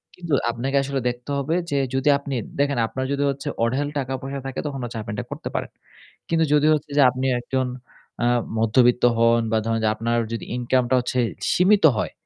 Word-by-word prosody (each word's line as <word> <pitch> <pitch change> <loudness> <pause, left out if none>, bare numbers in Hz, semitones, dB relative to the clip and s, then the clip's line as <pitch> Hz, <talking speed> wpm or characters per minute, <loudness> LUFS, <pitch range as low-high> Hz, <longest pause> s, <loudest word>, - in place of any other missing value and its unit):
কিন্তু 170 -4 -5 0.2
আপনাকে 135 +4 -1
আসলে 140 0 -2
দেখতে 120 +2 -8
হবে 140 +4 -1 0.2
যে 140 - +1 0.2
যদি 135 +2 +2
আপনি 140 -1 -5 0.2
দেখেন 140 -1 +1
আপনার 130 +3 -4
যদি 140 0 0 0.4
অঢেল 130 +5 0
টাকা-পয়সা 135 +1 -4
থাকে 135 -1 -4
তখন 140 -2 -5
হচ্ছে 120 -1 -5
আপনি 105 - -6
এটা - - -4
করতে - - -5
পারেন। - - -3 0.6
কিন্তু 165 -1 +2
যদি 150 0 +4
হচ্ছে 150 -1 -3
যে - - +6
আপনি 130 +1 -3
একজন 130 +1 -1 0.6
আ - - +3 0.3
মধ্যবিত্ত 120 +2 +3
হন 115 0 +4
বা 110 - +3
ধরেন 115 0 0
যে - - +4
আপনার 115 +2 -1 0.2
যদি 115 - -4
ইনকামটা 125 0 +1
হচ্ছে 125 +1 -2 0.3
সীমিত 195 +3 +4
হয়, - - -2
130 Hz, 185 wpm, -23 LUFS, 120-140 Hz, 0.6 s, যে